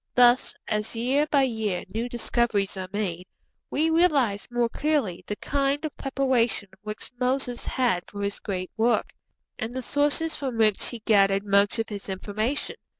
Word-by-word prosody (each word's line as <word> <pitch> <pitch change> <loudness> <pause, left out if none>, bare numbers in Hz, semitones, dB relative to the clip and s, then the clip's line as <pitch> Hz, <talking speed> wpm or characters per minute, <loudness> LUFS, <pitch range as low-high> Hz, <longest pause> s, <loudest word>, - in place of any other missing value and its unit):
Thus, 245 0 +5
as 210 +1 -2
year 265 +6 +1
by 280 -2 +4
year 220 -8 -1
new 230 +3 -2
discoveries 235 -4 0
are 185 -1 -4
made, 185 -4 -3 0.4
we 320 +2 +1
realize 285 - +2
more 240 -1 +1
clearly 280 - -1
the 210 - -2
kind 280 +5 0
of 305 - -5
preparation 260 -6 0
which 215 0 -7
Moses 250 -1 -1
had 235 -10 +1
for 205 0 -6
his 200 0 -2
great 185 -3 -4
work, 230 +2 +1 0.5
and 235 0 -4
the 260 - -3
sources 295 +4 +1
from 260 -5 -3
which 215 -3 +3
he 235 -3 -5
gathered 195 -2 +4
much 200 +2 +3
of 225 0 -2
his 205 -2 -6
information. 215 +8 -2
230 Hz, 160 wpm, -26 LUFS, 205-270 Hz, 0.5 s, Thus